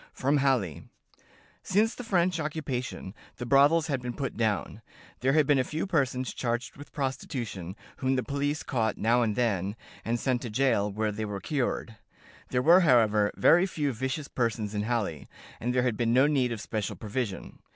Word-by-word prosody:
From 140 +3 +1
Halle: 130 - 0 0.8
"Since 215 +4 +2
the 250 - -8
French 180 -5 +1
occupation, 140 -10 -4 0.2
the 120 - -5
brothels 145 +5 +5
had 140 -5 -2
been 125 -1 -5
put 135 - -3
down. 110 -1 -1 0.4
There 130 +2 +2
had 155 -1 +4
been 140 -1 +3
a - - +3
few 155 +7 -3
persons 135 -8 0
charged 120 0 -3
with 145 +1 -12
prostitution, 120 - -4 0.2
whom 130 0 0
the 130 - 0
police 145 +2 -2
caught 110 -5 -1
now 120 +3 +3
and 110 -3 0
then, 100 -5 0 0.3
and 120 +1 -1
sent 125 -1 0
to 120 - -5
jail, 110 -3 +1
where 110 +1 -1
they 110 +1 -4
were 100 -1 -4
cured. 120 -4 -2 0.5
There 125 0 0
were, 170 +5 +7
however, 110 - +4
very 175 +3 +5
few 150 -6 -2
vicious 130 +5 -3
persons 115 -4 -2
in 105 - -1
Halle, 105 - -2 0.3
and 120 - -1
there 125 0 +2
had 120 -4 0
been 115 -1 +1
no 130 +3 +5
need 135 -5 +2
of 115 -3 -4
special 105 -2 -3
provision. 105 -3 -4
125 Hz, 185 wpm, -28 LUFS, 110-140 Hz, 0.8 s, were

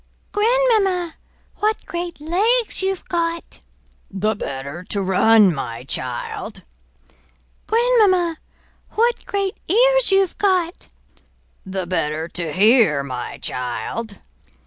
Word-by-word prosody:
"Grandmamma, 415 -6 +2 0.4
what 430 +1 -1
great 345 -1 -5
legs 415 +11 +1
you've 380 -1 -2
got!" 335 -1 -3 0.5
"The 205 +3 -1
better 140 0 -6
to 200 - -2
run, 195 +1 +5
my 115 -5 -5
child." 125 -2 -4 1.0
"Grandmamma, 420 -8 +3 0.5
what 470 +2 +1
great 395 -1 -2
ears - - +4
you've 390 -2 +2
got!" 370 -4 0 0.8
"The 190 -1 -3
better 160 -3 -2
to 170 -3 -4
hear, 200 - +4
my 125 -3 -6
child!" 165 - -4
335 Hz, 100 wpm, -20 LUFS, -, 1.0 s, run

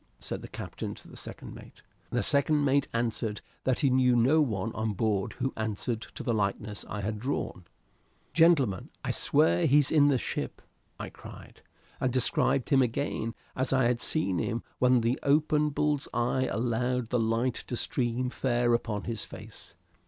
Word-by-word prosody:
said - - -6
the - - -8
captain - - -6
to - - -13
the - - -13
second - - -8
mate. - - -14 0.3
The 120 +5 0
second 145 0 +2
mate 140 0 +2
answered 115 -2 -1 0.2
that 130 -2 +1
he 140 - +3
knew 125 -1 +4
no 130 +7 +4
one 110 -5 -1
on 110 -1 -1
board 100 -1 0
who 130 - -2
answered 110 +1 -2
to - - -6
the 120 - 0
likeness 105 -1 -2
I 105 - -4
had 105 +2 -3
drawn. 120 -7 -3 0.7
"Gentlemen, 150 - +3 0.2
I - - 0
swear 85 +1 +3
he's 145 +1 +4
in 145 -2 +5
the 140 -2 +3
ship!" - - -4 0.4
I - - -6
cried, - - -12 0.4
and 130 - +1
described 130 +1 +1
him 135 -2 +5
again 120 -2 -1 0.2
as 130 - 0
I 130 -1 +3
had 120 0 +1
seen 100 - 0
him 120 0 -2 0.2
when 125 -1 +4
the 115 +3 0
open 150 +1 +3
bull's 150 -1 0
eye 125 +2 +1
allowed 120 +1 -1
the 125 - +2
light 115 +2 0
to 125 - -3
stream 125 +1 -1
fair 120 -2 +1
upon 110 -3 -1
his 115 -2 -3
face. - - -11
120 Hz, 175 wpm, -29 LUFS, 110-135 Hz, 0.7 s, in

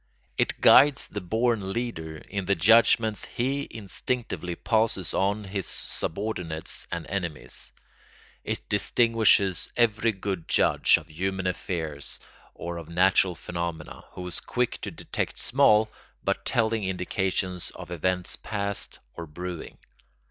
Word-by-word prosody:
It - - 0
guides 140 +1 +7
the 105 - -5
born 110 +1 0
leader 85 -10 -3
in 100 +5 -5
the 100 - +3
judgments 110 +3 +4
he 135 +4 -1
instinctively 110 -3 -3
passes 110 -6 +1
on 100 +2 +1
his 95 -1 -3
subordinates 85 -4 -4
and 85 -2 -3
enemies; 90 -5 -5 0.7
it - - -4
distinguishes 110 -3 +3
every 115 -1 +3
good 95 -4 -4
judge - - +4
of 75 - -10
human 95 +4 -2
affairs 80 -5 -2 0.4
or 85 0 -5
of 85 -1 -8
natural 90 +1 +3
phenomena, 85 -2 -5
who 90 - -6
is 90 - -4
quick 125 -1 -1
to - - -3
detect - - -4
small 110 -5 +4 0.4
but - - -1
telling 110 -1 +1
indications 95 -1 -1
of - - -9
events 90 +1 0
past 100 -1 -3 0.2
or 85 - -7
brewing. 90 +2 -6
95 Hz, 125 wpm, -27 LUFS, 85-110 Hz, 0.7 s, guides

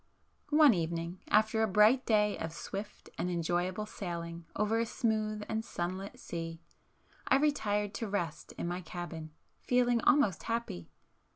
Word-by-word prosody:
One 300 -3 +7
evening, 170 0 -2
after 220 +1 +3
a 220 - +3
bright 215 +6 +5
day 210 -2 +3
of 160 0 -4
swift 205 +4 -7
and 180 - 0
enjoyable 175 +4 -1
sailing 170 -4 -6
over 210 +2 +1
a 230 - +2
smooth 215 -3 -1
and 220 0 -1
sunlit 185 0 -4
sea, 165 -1 -5 0.7
I - - +5
retired 210 -9 +1
to 225 - -2
rest 175 -6 -3
in - - -4
my 175 +1 -3
cabin, 170 -2 -6 0.3
feeling 245 -1 +2
almost 215 - +4
happy. 230 - -3
205 Hz, 145 wpm, -32 LUFS, 170-220 Hz, 0.7 s, One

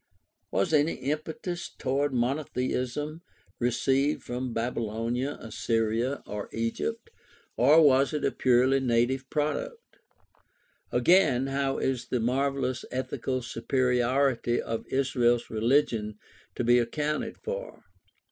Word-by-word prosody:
Was 165 - 0
any 150 +2 +3
impetus 160 +5 -4
toward 140 +2 0
monotheism 130 +3 -2 0.4
received 135 +4 +1
from 125 +1 -4
Baby 115 +2 -2
lonia, 115 +5 -2
Assyria, 115 +3 -1
or 105 0 -6
Egypt, 115 - -3 0.4
or 145 +7 +6
was 135 -1 +5
it 150 -2 -1
a - - +2
purely 130 +2 +3
native 130 +1 +1
product? 465 - -3 0.9
Again, 155 -9 +4
how 135 0 -1
is 125 -2 -1
the 125 - -1
marvelous 130 +1 0
ethical 130 0 -3
superiority 125 0 +1
of 115 0 -4
Israel's 125 -3 +1
religion 110 -2 +1 0.4
to - - -1
be 120 +1 +5
accounted 150 +6 -2
for? - - -6
130 Hz, 110 wpm, -28 LUFS, 120-145 Hz, 0.9 s, or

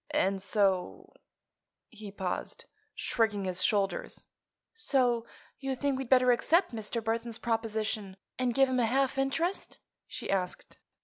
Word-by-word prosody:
And 195 -9 +2
so—" 195 -2 0 0.8
He 215 -4 -9
paused, 190 -2 -4 0.3
shrugging 210 -4 +1
his 185 -1 -1
shoulders. 200 -2 0 0.5
"So 250 - +1 0.3
you 270 -1 -2
think 275 0 -1
we'd 265 -3 -5
better 255 -1 +6
accept 330 +6 +3
Mr. 225 +1 -3
Burthon's 230 +1 -2
proposition 220 -4 -2 0.2
and 250 -2 +1
give 270 0 +5
him 255 -1 0
a 235 - +3
half 270 +2 +1
interest?" 320 +8 -1 0.3
she - - -6
asked. 185 -2 -3
230 Hz, 130 wpm, -30 LUFS, 205-265 Hz, 0.8 s, better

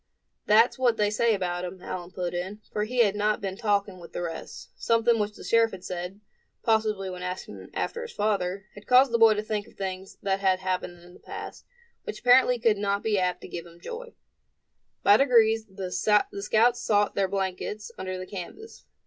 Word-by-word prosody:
"That's 225 +5 +5
what 240 -3 +3
they 210 -1 +2
say 225 +1 +2
about 175 -2 -2
him," 180 +1 -6
Allan 180 -1 -6
put 180 -2 -4
in; 185 +4 -4
for 210 - -1
he 245 +2 +3
had 205 -2 +1
not 210 +1 +1
been 195 -3 -4
talking 200 -2 0
with 170 - -13
the 175 - -3
rest; 165 -1 -7
something 230 0 +2
which 210 0 -2
the - - -11
sheriff 230 0 +3
had 185 -1 -8
said, 180 +3 -6 0.4
possibly 215 -3 +1
when 180 -1 -6
asking 180 +1 -6
after 470 - -2
his 475 -1 -7
father, 195 -2 -1
had 205 - -14
caused 255 +1 +6
the 235 - +2
boy 225 -1 +7
to 210 - -2
think 210 -1 -3
of - - -19
things 190 0 -6
that 195 -1 0
had 190 -1 +3
happened 185 -2 -3
in 175 0 -15
the - - -16
past, - - -9 0.4
which 440 - -6
apparently 250 0 +5
could 225 -3 +2
not 200 0 0
be 215 -3 +1
apt 180 -1 -1
to - - -9
give 170 0 -7
him 170 0 -16
joy. 470 - -8 0.9
By 205 +1 +7
degrees 225 -4 +4
the 190 -2 -6
scouts 215 +4 +2
sought 205 -3 +2
their 195 -1 +1
blankets 195 +2 -3
under 185 0 -4
the 185 - -6
canvas. 205 - -9
205 Hz, 200 wpm, -27 LUFS, 185-225 Hz, 0.9 s, boy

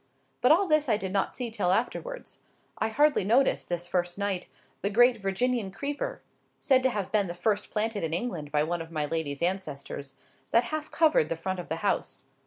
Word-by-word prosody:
But 250 - +5
all 360 +6 +5
this 305 -3 +3
I 215 - +4
did 190 -2 -3
not 195 - 0
see 245 -3 -3
till 205 -5 +1
afterwards. 365 - -2 0.4
I - - +1
hardly 290 +3 +3
noticed, 240 +8 +2
this 175 0 -1
first 175 0 -1
night, 200 -3 -2 0.3
the 200 - 0
great 240 +3 +5
Virginian 210 +2 0
Creeper 290 - -4 0.3
(said 265 -4 +3
to 260 - +3
have 205 -6 -3
been 205 -3 +2
the 175 - -5
first 210 +3 0
planted 215 -2 -1
in 160 - -1
England 170 -5 -2
by 150 0 +2
one 170 +2 -2
of 165 - -8
my 155 -2 -1
lady's 145 -1 -3
ancestors) 145 -7 -3 0.3
that 230 - +4
half 305 +5 -4
covered 310 - +3
the 165 - 0
front 185 +3 -3
of 175 - -7
the 160 - -1
house. - - 0
200 Hz, 200 wpm, -28 LUFS, 175-245 Hz, 0.4 s, But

